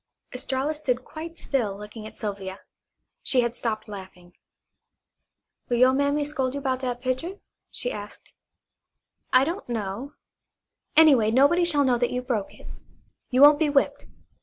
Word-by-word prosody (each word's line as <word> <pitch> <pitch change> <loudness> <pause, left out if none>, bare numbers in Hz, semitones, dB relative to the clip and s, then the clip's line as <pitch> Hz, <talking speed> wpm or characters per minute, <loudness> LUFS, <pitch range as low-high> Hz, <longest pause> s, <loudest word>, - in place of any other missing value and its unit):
Estralla 265 +3 -2
stood 255 -5 -2
quite 330 +2 -8
still 220 -8 -1
looking 210 +1 -9
at - - -14
Sylvia. 195 -3 -5 0.6
She 255 - +3
had 235 0 -1
stopped 225 -2 -3
laughing. 185 -3 -11 1.3
"Will 240 - +1
you' 255 +2 +5
mammy 285 +2 +1
scold 275 -3 -2
you - - -2
'bout 260 -2 -1
dat 245 -2 -3
pitcher?" 260 +9 -2 0.3
she - - -3
asked. - - -9 1.0
"I 255 0 +6
don't 340 -1 -4
know. 225 +4 -4 0.8
Anyway, 275 -9 +7
nobody 285 +9 +4
shall 295 -4 +2
know 250 -3 +2
that 245 - +1
you 250 0 -3
broke 235 -6 -3
it. - - -15 0.6
You 255 +2 +4
won't 290 0 +8
be 315 -2 +2
whipped. 280 -1 +1
255 Hz, 150 wpm, -25 LUFS, 225-285 Hz, 1.3 s, won't